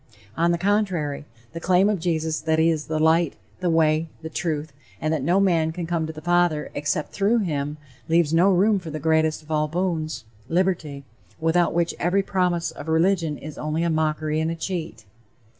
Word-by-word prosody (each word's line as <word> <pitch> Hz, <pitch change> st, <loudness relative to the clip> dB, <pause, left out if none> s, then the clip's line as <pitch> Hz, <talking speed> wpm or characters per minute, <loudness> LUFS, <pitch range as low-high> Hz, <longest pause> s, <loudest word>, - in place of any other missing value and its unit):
On 170 Hz, +1 st, +2 dB
the 170 Hz, -, +1 dB
contrary, 180 Hz, -7 st, 0 dB, 0.3 s
the 165 Hz, -, -5 dB
claim 185 Hz, +3 st, +3 dB
of 210 Hz, -3 st, 0 dB
Jesus 160 Hz, -2 st, -1 dB
that 160 Hz, 0 st, +1 dB
he 160 Hz, +1 st, +4 dB
is 155 Hz, -2 st, -3 dB
the 155 Hz, -, -1 dB
light, 160 Hz, 0 st, +3 dB, 0.2 s
the 180 Hz, -1 st, 0 dB
way, 160 Hz, 0 st, +2 dB
the 160 Hz, -, -6 dB
truth, 155 Hz, -3 st, -3 dB, 0.3 s
and 155 Hz, +1 st, 0 dB
that 155 Hz, -, -1 dB
no 175 Hz, +8 st, +2 dB
man 170 Hz, -5 st, +2 dB
can 170 Hz, +1 st, -5 dB
come 165 Hz, -1 st, -1 dB
to -, -, -4 dB
the 155 Hz, -1 st, -11 dB
father 175 Hz, -3 st, +1 dB
except 150 Hz, +2 st, -2 dB
through 210 Hz, +4 st, +2 dB
him, 150 Hz, -7 st, -2 dB, 0.3 s
leaves 165 Hz, -1 st, +3 dB
no 180 Hz, +4 st, +5 dB
room 200 Hz, +3 st, +3 dB
for 170 Hz, -3 st, -8 dB
the 155 Hz, -, -4 dB
greatest 160 Hz, 0 st, +1 dB
of 155 Hz, -, -12 dB
all 155 Hz, 0 st, +1 dB
boons 155 Hz, -7 st, -2 dB, 0.2 s
liberty, 165 Hz, -5 st, 0 dB, 0.4 s
without 165 Hz, +1 st, +2 dB
which 170 Hz, 0 st, +1 dB
every 190 Hz, +3 st, +2 dB
promise 180 Hz, -3 st, 0 dB
of 145 Hz, -, -10 dB
religion 165 Hz, -1 st, +1 dB
is 155 Hz, 0 st, -9 dB
only 155 Hz, +2 st, -1 dB
a 170 Hz, -, +1 dB
mockery 155 Hz, 0 st, 0 dB
and 160 Hz, +1 st, 0 dB
a 165 Hz, -, -2 dB
cheat. 165 Hz, -, -5 dB
160 Hz, 195 wpm, -24 LUFS, 155-175 Hz, 0.4 s, no